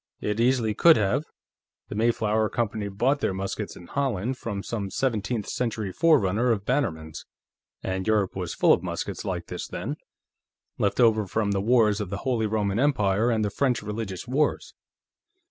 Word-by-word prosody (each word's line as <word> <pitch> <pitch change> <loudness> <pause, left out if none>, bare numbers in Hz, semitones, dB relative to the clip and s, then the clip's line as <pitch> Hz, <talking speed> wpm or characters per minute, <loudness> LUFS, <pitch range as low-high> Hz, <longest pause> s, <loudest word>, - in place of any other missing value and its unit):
"It 105 +1 -2
easily 120 -2 +2
could 165 +9 +6
have. 110 +8 +1 0.6
The - - -5
Mayflower 110 -1 +1
Company 110 -3 -2
bought 125 +9 +1
their 95 - -1
muskets 95 0 -4
in 85 - -12
Holland, 130 -1 -1
from 105 -5 -5
some 105 -4 -3
seventeenth 110 -2 -1
century 110 -5 -2
forerunner 120 - +3
of 100 -3 -1
Bannerman's, 85 - -2 0.6
and 95 +1 -3
Europe 105 -3 +1
was 90 -3 -4
full - - +5
of - - +1
muskets - - -4
like - - -3
this - - -6
then, - - -5 0.8
left 100 +3 0
over 110 -4 +4
from 105 +1 0
the 100 -1 0
wars 110 -2 +3
of 100 - -4
the 100 - -3
Holy 120 -4 +1
Roman 105 -1 0
Empire 110 -6 +2
and 110 -2 +1
the 100 - -2
French 125 0 0
religious 105 -1 -5
wars." 145 +4 0
110 Hz, 165 wpm, -26 LUFS, 100-120 Hz, 0.8 s, could